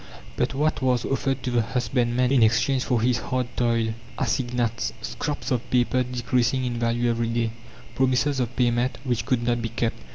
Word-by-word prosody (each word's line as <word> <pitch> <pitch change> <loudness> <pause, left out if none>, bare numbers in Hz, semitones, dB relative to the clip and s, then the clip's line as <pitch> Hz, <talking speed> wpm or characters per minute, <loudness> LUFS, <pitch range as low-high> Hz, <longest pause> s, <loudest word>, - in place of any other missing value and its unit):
But - - -1
what 150 +2 +1
was 125 -3 +1
offered 135 -1 -1
to 125 - -1
the 120 -1 +3
husbandman 125 +1 0
in 135 -3 +4
exchange 120 +4 +3
for 125 -3 +1
his 125 +1 +2
hard 130 0 -1
toil? 115 -2 +1 0.2
Assignats, 120 -3 -1
scraps 150 0 -4
of 125 -2 -1
paper 125 +1 +2
decreasing 125 +1 0
in 120 -1 -2
value 120 +1 +1
every 115 0 -1
day, 115 -1 0 0.4
promises 130 +2 +1
of 125 0 -2
payment, 120 0 +1
which 125 -4 -1
could 125 -2 +1
not 120 0 +1
be 115 - -2
kept. 115 0 -2
120 Hz, 175 wpm, -25 LUFS, 115-130 Hz, 0.4 s, in